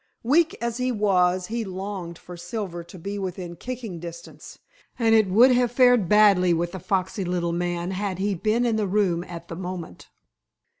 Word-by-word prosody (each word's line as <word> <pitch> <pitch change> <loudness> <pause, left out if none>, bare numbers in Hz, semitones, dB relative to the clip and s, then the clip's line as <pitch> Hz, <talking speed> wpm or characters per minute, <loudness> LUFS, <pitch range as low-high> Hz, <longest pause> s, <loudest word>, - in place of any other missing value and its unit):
Weak 315 +7 +2
as 235 0 -2
he 255 0 0
was, 185 -4 +2
he 230 +4 -3
longed 190 -3 -6
for 180 - -11
Silver 175 0 -5
to 175 +2 -12
be 200 +4 -5
within 180 -2 -5
kicking 235 -6 -6
distance, 165 -2 -10 0.4
and 225 -2 +3
it 215 -3 +4
would 235 +7 +6
have 245 -1 +2
fared 245 -6 +4
badly 200 -4 +5
with 170 +1 -2
the 190 - -6
foxy 190 +2 -1
little 175 -1 -1
man 175 +1 -2
had 190 -1 -3
he 200 +2 0
been 215 +6 0
in 230 -2 +1
the 210 -2 0
room 185 -4 +1
at 170 -1 -9
the 165 - -7
moment. 180 -1 -7
190 Hz, 185 wpm, -24 LUFS, 175-220 Hz, 0.4 s, would